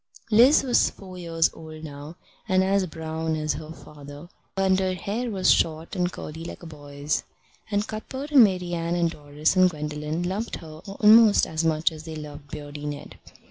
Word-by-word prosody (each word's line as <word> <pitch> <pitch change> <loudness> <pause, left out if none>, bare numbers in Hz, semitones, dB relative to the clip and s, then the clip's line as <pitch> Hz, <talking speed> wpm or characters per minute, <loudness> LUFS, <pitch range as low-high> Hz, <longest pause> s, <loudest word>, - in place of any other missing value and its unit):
Liz 245 +8 +6
was 250 -3 +3
four 185 -2 -12
years 165 -1 +1
old 155 -1 -11
now, 145 +1 -9 0.3
and 190 0 +4
as 195 0 +1
brown 160 0 -3
as 155 0 -1
her 155 0 -8
father, 145 0 -12 0.3
and 190 -1 +3
her 185 -1 0
hair 220 +7 -3
was 190 -4 +3
short 160 +2 +1
and 180 -1 0
curly 160 -1 -8
like 170 - -8
a - - -8
boy's; 145 -1 -3 0.5
and 205 0 0
Cuthbert 265 +7 -6
and 275 -5 +8
Marian 175 -4 0
and 170 -1 +1
Doris 150 +2 -1
and 185 0 +6
Gwendolen 150 +1 -4
loved 195 +6 -3
her 155 -2 -10
almost 210 +2 +6
as 160 +1 -2
much 160 +1 +2
as 155 0 -10
they 160 -1 -7
loved 145 -1 -9
Beardy 145 0 -7
Ned. 145 -1 -7
165 Hz, 180 wpm, -25 LUFS, 155-190 Hz, 0.5 s, and